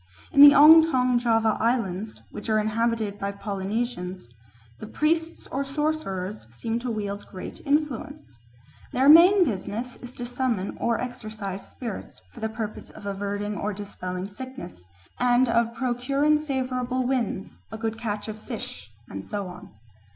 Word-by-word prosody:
In 280 - +6
the 285 0 +11
Ongtong 290 -5 +7
Java 225 -2 +2
Islands, 215 -3 -1
which 210 - -7
are 215 - +3
inhabited 215 -1 0
by 200 0 -2
Polynesians, 195 - -4 0.5
the 215 - -7
priests 320 +6 0
or 275 +2 -2
sorcerers 270 - -3
seem 225 - -3
to 245 +1 -4
wield 205 -2 -4
great 185 - -8
influence. 285 - -1 0.6
Their 265 +2 +3
main 355 +5 +8
business 230 - -4
is 245 0 -10
to 245 - -5
summon 245 -5 -2
or 235 -1 +1
exorcise 215 -6 -6
spirits 230 -6 -7
for - - -12
the 220 - -2
purpose 220 -1 -6
of - - -12
averting 205 +1 -3
or 210 +1 -2
dispelling 185 -2 -5
sickness, 205 - -9 0.4
and 245 +1 +4
of 230 0 +1
procuring 275 +5 +1
favourable 255 -3 -2
winds, 245 -7 -2
a 220 - -5
good 225 0 -3
catch 210 -3 -3
of 215 0 -6
fish, 215 - -7 0.2
and 95 0 -7
so 205 - -4
on. 180 -1 -10
230 Hz, 145 wpm, -25 LUFS, 205-255 Hz, 0.6 s, the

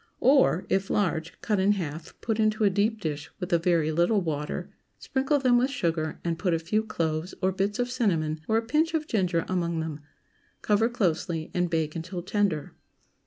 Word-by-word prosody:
Or, 265 - +4
If 195 0 0
large, 170 -4 -1
cut 210 -3 0
in 195 +2 +4
half, 160 -4 -6
put 225 -1 -1
into 215 0 +2
a 200 - +4
deep 210 +3 +1
dish, 155 -4 -4
with 180 -1 -3
a 170 - +5
very 165 -2 +2
little 175 +7 +3
water; 150 -5 -3 0.3
sprinkle 270 +2 0
them 250 -3 +4
with 255 +2 +2
sugar, 165 - -1
and 170 -1 -1
put 180 -3 +1
a - - +2
few 190 +7 0
cloves, 165 -5 -2
or 190 0 +2
bits 195 +2 -1
of 245 0 -1
cinnamon, 165 - 0
or 220 - +3
a 225 - +1
pinch 315 +6 +1
of 310 -1 0
ginger 180 - 0
among 170 -3 -1
them. 160 -2 -4 0.6
Cover 215 +2 +3
closely, 170 -7 -1
and 180 -1 +1
bake 160 -2 -1
until 175 +2 -5
tender. 190 -6 0
185 Hz, 190 wpm, -27 LUFS, 165-220 Hz, 0.6 s, a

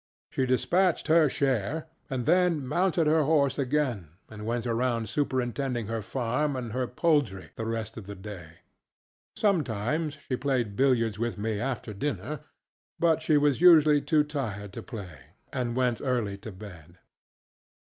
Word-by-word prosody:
She 130 - 0
dispatched 175 +9 +2
her 160 -2 +5
share 135 +2 0 0.2
and 130 -3 -2
then 180 -6 +3
mounted 175 +3 +1
her 155 +1 +4
horse 145 -2 +2
again 130 - 0 0.2
and 105 0 -7
went 120 0 -1
around 115 -1 0
superintending 130 -3 -1
her 115 +1 -3
farm 130 +6 -1
and 120 -3 -4
her 125 +2 -1
poultry 130 - 0
the 110 - -4
rest 115 -1 -4
of 105 -4 -8
the 100 - -6
day. 95 -5 -10 0.7
Sometimes 150 - 0
she 130 - 0
played 125 -8 -1
billiards 115 -5 +2
with 115 -1 -2
me 105 0 -2
after 120 -3 -3
dinner, 145 +5 -3 0.6
but 165 -2 +2
she 155 -1 +3
was 145 0 +2
usually 155 -4 +7
too 150 +1 +3
tired 110 -10 -4
to - - -6
play, 95 -9 -8 0.3
and 120 -2 -2
went 125 -3 +1
early 120 -7 -1
to 110 +2 -8
bed. 90 -4 -12
125 Hz, 150 wpm, -28 LUFS, 110-150 Hz, 0.7 s, usually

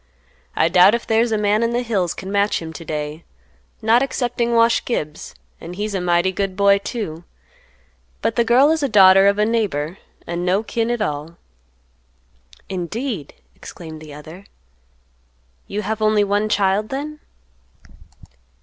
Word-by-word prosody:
I - - +3
doubt 180 +5 +6
if 235 - -5
there's 225 +1 +2
a 220 - +1
man 210 +1 +1
in 230 0 0
the 245 +1 0
hills 200 -7 -1
can 190 +1 -7
match 200 +1 +1
him 160 -1 -8
to 165 - -9
day; 150 0 -5 0.6
not 225 +3 +4
excepting 240 -3 -1
Wash 230 0 +3
Gibbs; 155 -10 -4 0.2
an' 170 - -8
he's 205 +3 -4
a 190 - -1
mighty 175 +1 +2
good 195 0 -3
boy, 200 0 +4
too. 200 -7 -5 1.0
But 230 - 0
the 235 - +3
girl 250 +6 +4
is 320 -1 0
a 280 - 0
daughter 195 -2 +7
of 200 0 +3
a 210 - +2
neighbor, 195 -8 -1 0.3
and 170 +1 -4
no 185 +4 +1
kin 230 +1 -2
at 240 -3 0
all." 150 0 -5 1.3
"Indeed!" 190 - -4 0.2
exclaimed 160 -2 -10
the 155 -1 -11
other, 160 +6 -11 1.2
"you 210 +2 -4
have 220 +2 -3
only 215 -1 +3
one 205 +1 0
child 205 +1 +1
then?" 300 +3 -5
200 Hz, 160 wpm, -20 LUFS, 175-230 Hz, 1.3 s, daughter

